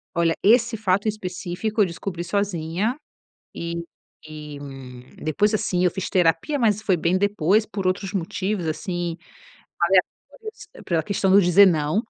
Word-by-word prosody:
Olha, 170 -1 +2
esse 230 +2 +4
fato 200 -1 0
específico, 205 +1 -3
eu - - +6
descobri 175 0 -5
sozinha 190 - -1 0.6
e 170 0 -4 0.4
e, 150 -2 -9
hum, 135 -3 -10 0.2
depois 205 +8 +1
assim, 200 -4 0
eu 180 - +3
fiz 190 +1 -4
terapia, 180 - +1
mas 215 -5 +2
foi 195 -5 +1
bem 170 +3 +1
depois, 205 +1 +2
por 210 -3 -6
outros 185 +1 -1
motivos, 195 0 -2
assim, 170 +1 -3 0.7
aleatórios 445 -1 -1 0.2
pela 170 -2 +1
questão 195 +1 0
do 200 +1 +7
dizer 180 +2 +6
não. 165 +3 +1
185 Hz, 145 wpm, -23 LUFS, 170-210 Hz, 0.7 s, do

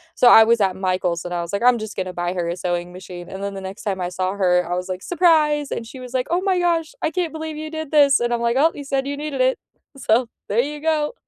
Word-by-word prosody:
so 245 - +6
I 225 - +9
was 230 +1 +3
at 190 -2 +2
Michael's 185 -2 -1
and 175 - -5
I 175 - -1
was 170 - -8
like, 200 - -1
"I'm 250 0 +5
just 215 -1 -7
gonna 185 -1 -2
buy 175 0 -2
her 175 -2 -2
a 175 - -3
sewing 175 0 -3
machine," 180 -1 -9
and 190 +1 -7
then 200 0 -3
the 195 - -6
next 190 +1 -8
time 195 -4 -2
I 175 - -2
saw 185 +1 -2
her, 180 -2 +2
I 175 - 0
was 180 +1 -4
like, 185 0 -5
"Surprise!" 305 -5 +2
And 230 - -3
she 260 - -10
was 250 0 -10
like, 250 -1 +1
"Oh 350 - +2
my 380 -1 +1
gosh, 335 -2 0
I 320 - +1
can't 350 -2 -2
believe 315 0 -5
you 310 0 -5
did 315 -2 -5
this," 285 -2 +5
and 240 0 0
I'm 235 - -1
like, 235 0 +1
"Oh, 320 +3 +4
you 285 - -7
said 270 -1 -1
you 285 - -3
needed 290 -3 -3
it, 260 +1 +2 0.4
so 240 -1 +2 0.2
there 220 +4 +3
you 295 +3 -5
go." 310 +1 0
235 Hz, 295 wpm, -21 LUFS, 185-300 Hz, 0.4 s, I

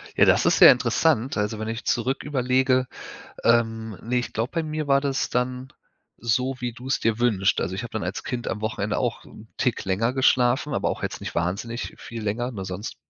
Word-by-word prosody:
Ja, - - +6
das - - +4
ist - - +3
ja - - +12
interessant. 120 +2 +1
Also, 105 +1 -1
wenn 110 - -4
ich 115 +2 -4
zurück 130 +3 0
überlege, 130 -2 +1 0.6
ähm, 110 -3 +1
ne 125 +2 -1
ich 120 - -4
glaube, 115 +3 -2
bei 165 -1 0
mir 155 -1 -3
war 140 -1 +4
das 140 -1 -1
dann 125 +1 -2 0.5
so, 125 +3 0
wie 120 -1 -2
du 125 +3 -11
es 135 - +1
dir 115 0 +1
wünschst. 105 -5 +2
Also, 95 - -2
ich 100 - -4
habe 120 - -7
dann 110 - -3
als 90 +2 -4
Kind 120 -2 -3
am 105 - -3
Wochenende 105 -1 -2
auch 120 -2 -2
'n 110 - -14
Tick 125 -3 0
länger 105 +6 0
geschlafen, 130 +1 +2
aber - - 0
auch - - -5
jetzt - - -4
nicht - - -6
wahnsinnig 115 +7 -3
viel 115 -2 -7
länger, 115 +4 -2
nur 100 -6 -6
sonst 95 +3 -6
120 Hz, 215 wpm, -24 LUFS, 110-130 Hz, 0.6 s, ja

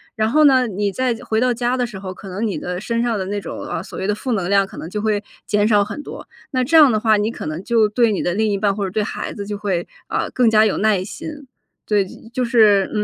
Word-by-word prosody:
然 215 -2 +1
后 305 +3 +5 0.2
你 205 -2 -2
再 255 +3 0 0.2
回 220 - +2
到 250 +1 +2
家 245 +2 -1
的 250 - +1
时 210 -5 -8
候， 190 -1 -6
可 185 - -11
能 195 +4 -3
你 205 - -2
的 180 +1 -4
身 230 +1 -1
上 230 -3 0
的 190 - -2
那 205 +2 -3
种， 185 - -7
呃， 165 - -4
所 190 - -9
谓 190 - -2
的 210 - +1
负 255 +4 -4
能 190 -6 -1
量 200 0 +4
可 - - -13
能 160 - -6
就 210 - -3
会 210 -1 0 0.2
减 205 0 +2
少 205 -2 +4
很 290 - -6
多。 - - -9 0.2
那 255 -1 0
这 315 +6 0
样 300 -5 +8
的 215 - +1
话， 220 -1 +3
你 205 +1 0
可 230 - -7
能 155 +4 -5
就 225 -1 +3
对 230 +2 +2
你 200 - -1
的 175 - 0
另 220 +3 +1
一 200 - 0
半 200 0 +1
或 205 - -3
者 195 - -2
对 210 +3 -1
孩 - - -4
子 200 - -6
就 205 0 -4
会， 185 -4 -2 0.2
呃， - - -1
更 245 -2 +3
加 215 0 +5
有 210 - 0
耐 205 -3 +2
心。 300 - -8 0.4
对， 205 -2 +3
就 - - -12 0.2
就 255 - 0
是， 215 -5 +4
210 Hz, 305 characters per minute, -20 LUFS, 195-235 Hz, 0.4 s, 样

